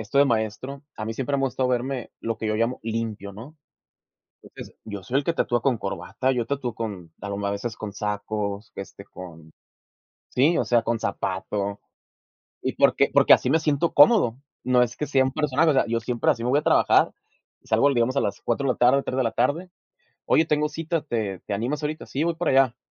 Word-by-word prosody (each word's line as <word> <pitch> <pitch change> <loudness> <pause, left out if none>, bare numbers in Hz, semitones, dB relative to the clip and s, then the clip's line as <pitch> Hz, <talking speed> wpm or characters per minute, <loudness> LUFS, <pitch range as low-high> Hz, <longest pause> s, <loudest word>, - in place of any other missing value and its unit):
esto 110 +6 -1
de 140 - +7
maestro, 120 +3 -2
a 110 - -4
mí 110 - -3
siempre 135 +4 -2
me 135 - -1
ha - - +2
gustado 130 0 -1
verme, 125 0 -2
lo 115 -1 -3
que 110 - -3
yo 110 - 0
llamo 115 +3 -1
"Limpio", 110 -3 -4
¿no? 125 +11 -11 0.9
Entonces, - - -12
yo 100 -3 -7
soy 125 +8 0
el 140 - -2
que 170 - +1
tatúa 120 -7 0
con 130 -3 +1
corbata, 100 +7 -2
yo 120 -3 -1
tatúo 130 -5 -3
con, 95 -8 -6
alguna 100 0 -3
veces, 110 +3 -4
con 105 -2 -6
sacos, 105 0 -4
este, 100 0 -8
con, 80 -5 -12 0.8
sí, 155 +7 +2
o - - +1
sea, 120 -1 +2
con 115 0 -1
zapato. 100 +1 -3 0.8
Y - - -2
porque - - +3
porque - - +6
así - - +5
me 160 - +4
siento 155 +1 0
cómodo, 145 - +6 0.3
no 125 -1 +4
es 120 -1 -1
que 150 - -3
sea 135 -1 +3
un 130 - -1
personaje, 150 +2 +2
o - - +4
sea, 135 - +2
yo 115 0 -1
siempre 120 +1 0
así 115 - -1
me 125 - +1
voy 140 - +4
a - - -1
trabajar, - - +4 0.5
salgo 140 - +3
l 140 - +1
digamos 120 +3 +1
a - - +3
las 100 - -2
4:00 130 +4 -1
de 125 - +3
la - - -19
tarde, 130 +3 +4
3:00 130 - -4
de 130 - +2
la 115 - -1
tarde: 145 +11 0 0.5
"Oye, 160 - +3
tengo 150 -1 +1
cita, 160 +1 -3
¿te 110 - -3
te 100 - -4
animas 125 +9 -2
ahorita?". 155 +1 -4
"Sí, 145 +4 -2
voy 170 0 0
para 170 - -1
allá". 130 -2 +3
120 Hz, 220 wpm, -24 LUFS, 105-140 Hz, 0.9 s, de